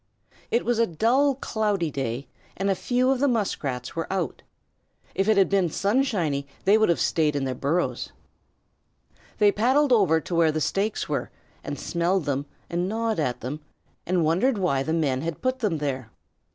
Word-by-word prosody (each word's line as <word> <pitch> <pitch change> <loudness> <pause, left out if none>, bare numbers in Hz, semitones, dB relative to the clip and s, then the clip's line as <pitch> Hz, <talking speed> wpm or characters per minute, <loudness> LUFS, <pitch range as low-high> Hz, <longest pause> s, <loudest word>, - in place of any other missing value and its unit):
It 235 - +1
was 240 -1 +1
a 230 - +4
dull, 255 - +2
cloudy 210 - -1
day 130 -1 -3 0.3
and 195 +1 +1
a - - +4
few 250 +6 +1
of 265 - +1
the 285 - +3
Muskrats 145 - -2
were 165 +2 -3
out. 180 -7 -2 0.7
If 195 +3 0
it 215 - +4
had 195 - +5
been 195 -3 +2
sunshiny 195 - 0 0.2
they 200 - +6
would 220 -2 +3
have 170 - +2
stayed 155 -3 +1
in 140 - 0
their 130 -1 -1
burrows. 150 +8 -1 1.3
They 205 -1 +5
paddled 260 +6 +3
over 185 -8 +4
to 165 - -7
where 165 -2 +4
the 155 - -2
stakes 200 +7 -1
were, - - -2 0.3
and - - -5
smelled 175 +2 0
of - - -12
them 140 -1 -1 0.2
and 175 +2 -1
gnawed 225 -2 -1
at 125 -5 -1
them, 130 +6 -4 0.5
and 175 -2 +2
wondered 205 +11 +2
why 175 -9 +1
the 155 - -2
men 145 -6 +1
had 165 0 -4
put 255 0 0
them 205 -9 0
there. 135 -5 -3
180 Hz, 185 wpm, -25 LUFS, 150-220 Hz, 1.3 s, they